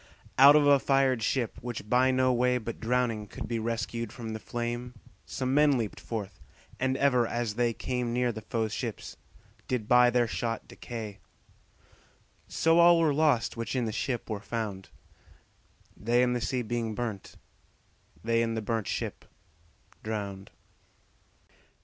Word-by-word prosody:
Out 140 +2 +9
of 150 -1 +5
a 140 -1 +6
fired 135 -3 +2
ship, 120 +1 -1
which 120 -3 -6
by 125 +3 +3
no 130 0 +3
way 125 +1 +2
But 115 -1 -6
drowning 115 -3 0
could - - -7
be 115 -1 -2
rescued 115 0 -3
from 115 -2 -7
the 110 - -5
flame, 120 +2 -4 0.3
Some 130 0 -2
men 145 -1 +4
leap'd 110 -4 -3
forth, 105 -4 -6 0.4
and 130 0 0
ever 125 -4 +3
as 120 -2 -2
they 120 +1 +1
came 125 0 -3
Near 125 0 +1
the 110 -1 -7
foes' 110 0 -2
ships, - - -5 0.5
did 120 -5 -2
by 125 0 +6
their 120 -1 +2
shot 115 +1 -3
decay; 110 -4 -7 1.3
So 165 +1 +3
all 170 0 +7
were 160 -3 +3
lost, 145 -6 +2
which 115 +2 -3
in 125 -2 0
the 110 - -2
ship 120 +2 -3
were 110 -3 -3
found, 105 -3 -5 1.1
They 120 +3 +2
in 125 0 +2
the 120 - -2
sea 125 +1 -1
being 115 -1 -3
burnt, 110 -5 -5 0.9
they 115 +1 +2
in 115 -1 -1
the 110 - -2
burnt 110 -1 -2
ship - - -4 0.8
drowned. 100 -3 -5
120 Hz, 155 wpm, -28 LUFS, 110-125 Hz, 1.3 s, Out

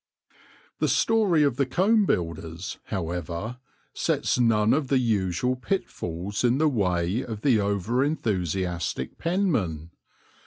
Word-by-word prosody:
The - - +2
story 205 -9 +3
of 140 -4 +1
the 140 - +2
Comb 205 - +3
Builders, 85 - -3
however, 90 +4 -4 0.3
sets - - 0
none 110 -3 +3
of 145 -1 0
the 135 - +3
usual 110 0 +1
pitfalls 100 - -3
in 120 +1 +3
the 155 +2 +3
way 95 -2 0
of 110 -3 -6
the 125 -5 +3
over 100 +5 0
enthusiastic 90 - -2
penman. 110 - -1
110 Hz, 120 wpm, -26 LUFS, 90-135 Hz, 0.3 s, story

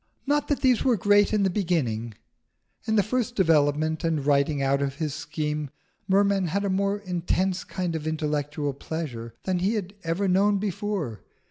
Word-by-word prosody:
Not 290 +1 +1
that 290 - 0
these 255 -4 +3
were 250 -4 +3
great 205 +1 +4
in 210 -2 +2
the 190 - +3
beginning. 125 - -1 0.7
In 220 - +2
the 205 - +4
first 245 +2 -1
development 155 -3 +2
and 160 -4 0
writing 140 0 +2
out 135 0 +1
of 140 -1 -1
his 150 -1 -3
scheme, 150 0 -3 0.4
Merman 195 -1 +3
had 200 +5 -1
a 195 - 0
more 200 +1 +1
intense 185 -1 -1
kind 180 -3 -3
of 155 -1 -4
intellectual 150 -2 -2
pleasure 130 -6 -6
than 185 -2 0
he 195 +5 +1
had 195 -2 -3
ever 170 +4 0
known 200 +2 +3
before. 195 - -3
175 Hz, 170 wpm, -26 LUFS, 150-200 Hz, 0.7 s, great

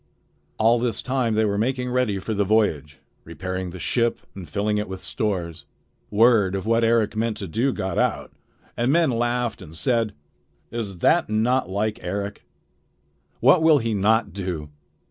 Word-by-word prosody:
All 115 +2 +4
this 120 -1 -2
time 125 -4 0
they 110 0 +3
were 100 -1 0
making 125 +2 -1
ready 125 -5 +1
for 110 +4 -4
the 100 -1 +1
voyage, 80 -9 0 0.2
repairing 95 +2 -5
the 90 - -8
ship 115 +6 0
and 90 -5 -9
filling 105 +5 0
it 105 - -3
with 95 0 -6
stores. 90 -6 -3 0.4
Word 105 -3 +4
of 95 - -4
what 115 +1 +2
Eric 115 -2 +2
meant 110 0 -1
to 100 - -5
do 115 +10 0
got 95 -5 -2
out, - - 0 0.4
and 120 +3 +1
men 165 -2 +3
laughed 120 0 -1
and 80 - -11
said: 115 +1 0 0.6
"Is 110 -5 -4
that 170 -5 +3
not 115 +1 +1
like 105 +3 -1
Eric? 100 +3 -4 1.0
What 140 +8 +6
will 160 -2 +6
he 115 -4 -1
not 110 +3 +2
do?" 90 -6 -4
110 Hz, 165 wpm, -23 LUFS, 95-120 Hz, 1.0 s, What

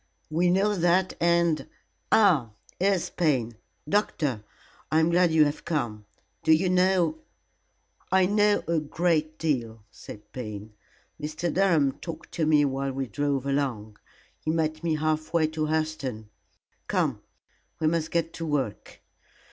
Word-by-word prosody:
"We 175 +3 +2
know 195 +4 +2
that, 180 +1 +2
and 170 -2 +2 0.4
ah, 160 - +4 0.3
here 195 +2 +3
is 180 - -2
Payne. 130 -9 0 0.3
Doctor, 150 - 0 0.5
I 155 - +4
am 160 +1 +3
glad 175 0 +4
you 160 -1 +5
have 145 +1 -3
come. 115 -10 -3 0.3
Do 160 - +2
you 180 +3 +2
know 185 - +2 0.5
" - - -39
"I 190 -1 +5
know 205 +1 +2
a 165 -1 +2
great 155 0 0
deal," 115 -8 -2
said 105 0 -12
Payne. 105 -3 -7 0.5
"Mr. 155 +3 -3
Durham 170 -8 +3
talked 165 - -8
to 160 -2 -1
me 150 -2 +4
while 135 0 -2
we 135 0 -2
drove 140 +3 -1
along. 125 -7 -2 0.4
He - - -5
met 155 0 -1
me 165 -2 +1
half 155 +1 -1
way 160 -2 +4
to 155 -1 -2
Hurseton. 150 -8 -2 0.6
Come, - - 0 0.6
we 160 - -1
must 160 0 +1
get 165 -1 -1
to 165 - -5
work." 135 -8 -3
155 Hz, 150 wpm, -26 LUFS, 135-170 Hz, 0.6 s, you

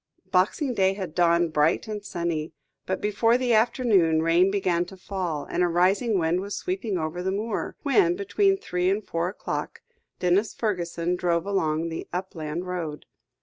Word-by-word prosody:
Boxing 210 - +2
Day 190 -3 +3
had 190 -5 -6
dawned 170 -2 +3
bright 155 +8 +2
and 210 -1 -5
sunny, 170 -4 -3 0.3
but 190 - -2
before 225 +3 +2
the 250 -2 +1
afternoon, 210 -8 +3
rain 170 +3 +4
began 185 -3 +1
to 190 +2 -12
fall, 180 -6 -3
and - - -1
a 180 - +4
rising 190 +6 +2
wind 170 +1 +1
was 200 +1 -5
sweeping 360 - -2
over 160 +2 -3
the 190 +1 -1
moor, 210 +2 -3
when, 345 +5 +3
between 395 0 +2
three 180 - -1
and 200 +2 -1
four 170 +1 -1
o'clock, 195 - -5 0.4
Denis 185 +4 +1
Fergusson 175 -4 -1
drove 170 -1 0
along 165 -5 0
the 165 - -6
upland 175 -2 -4
road. 165 -5 -4
185 Hz, 165 wpm, -25 LUFS, 170-210 Hz, 0.4 s, rain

